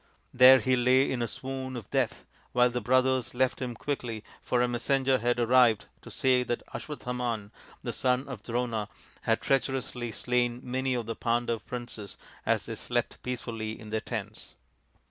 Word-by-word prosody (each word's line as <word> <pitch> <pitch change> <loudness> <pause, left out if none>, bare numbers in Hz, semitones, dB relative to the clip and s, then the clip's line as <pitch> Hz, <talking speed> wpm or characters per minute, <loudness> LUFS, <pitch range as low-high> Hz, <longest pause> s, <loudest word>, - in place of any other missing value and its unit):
There 130 +1 +9
he 130 +3 +2
lay 125 +2 +4
in 125 -2 -1
a 120 - 0
swoon 130 +2 -5
of 110 - -8
death - - 0 0.3
while 125 0 +4
the 125 0 -2
brothers 130 +1 +2
left 130 +1 +1
him 125 -2 -3
quickly, 115 -4 -3 0.2
for 125 - 0
a - - +2
messenger 130 +2 +1
had 120 +1 +1
arrived 120 -2 +5 0.2
to - - -11
say 130 -1 +2
that 120 -1 -2
Aswa 150 - -5
thaman, 120 -4 -3 0.3
the - - -3
son 130 +1 +1
of 130 -7 -7
Drona, 115 -2 -2 0.4
had - - +3
treacherously 130 -3 -1
slain 120 +1 0
many 130 +1 -1
of 120 -2 -2
the 115 0 -4
Pandav 120 -1 -1
princes 120 -5 -7 0.3
as - - +2
they - - -5
slept - - -2
peacefully 115 -3 -4
in 110 -1 -10
their 110 0 0
tents. - - -6
125 Hz, 170 wpm, -29 LUFS, 115-130 Hz, 0.4 s, There